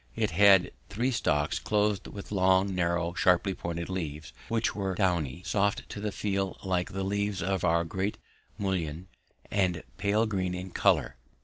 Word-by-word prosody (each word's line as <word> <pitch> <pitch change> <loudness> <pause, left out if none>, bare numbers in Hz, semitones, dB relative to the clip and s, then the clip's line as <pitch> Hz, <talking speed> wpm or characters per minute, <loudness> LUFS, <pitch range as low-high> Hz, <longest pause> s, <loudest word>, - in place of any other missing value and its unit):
It 110 -2 0
had 100 -2 +6 0.2
three 120 +6 0
stalks 75 - 0
clothed 105 -1 0
with 100 0 -9
long, 95 0 +3
narrow, 85 -1 0
sharply 90 +2 +3
pointed 85 -1 -4
leaves, 80 -5 -5
which 115 -1 0
were 95 -2 -2
downy, 85 -5 0
soft 100 0 0
to - - -6
the 105 0 -2
feel 100 -2 -2
like 90 -2 -1
the 95 0 -3
leaves 100 -1 -1
of 95 -1 -1
our 85 -1 +3
great 95 +4 -2 0.4
mullein, 90 -3 -2 0.4
and 90 -5 +1
pale 105 +3 +2
green 95 -4 -1
in 90 +1 -6
colour. - - +2
95 Hz, 155 wpm, -29 LUFS, 90-100 Hz, 0.4 s, had